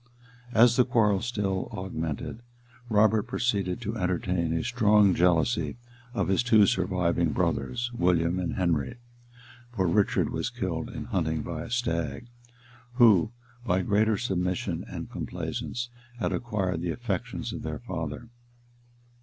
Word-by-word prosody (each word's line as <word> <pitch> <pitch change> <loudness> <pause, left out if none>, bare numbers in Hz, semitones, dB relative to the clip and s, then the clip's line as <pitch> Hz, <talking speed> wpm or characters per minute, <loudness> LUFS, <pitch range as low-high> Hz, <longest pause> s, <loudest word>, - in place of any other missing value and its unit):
And 120 - -7
as 120 +2 +6
the 125 - +7
quarrel 105 -5 +2
still 105 -5 -2
augmented, 85 +3 -4 0.5
Robert 110 0 +3
proceeded 105 -3 -1
to 110 0 -3
entertain 90 -3 0
a 80 0 0
strong 105 -5 +4
jealousy 90 +8 +2 0.4
of - - 0
his 95 +4 +2
two 110 -4 +5
surviving 90 -3 +1
brothers, 70 - -1
William 90 -3 +2
and 90 -2 -2
Henry, 85 - 0 0.8
(for 95 -3 +1
Richard 95 +4 +2
was - - -2
killed, - - -3
in - - -6
hunting, 80 -1 -1
by 80 -1 -5
a - - -9
stag,) 120 -1 -2 0.6
who, 110 -8 +5 0.3
by 95 -4 +1
greater 105 +2 +2
submission 90 -5 -1
and - - -7
complaisance, 120 0 -4 0.3
had - - -1
acquired 95 -8 -1
the 85 - -2
affections 100 0 -3
of - - -5
their 80 -1 -4
father. 80 - -5
95 Hz, 135 wpm, -27 LUFS, 85-115 Hz, 0.8 s, the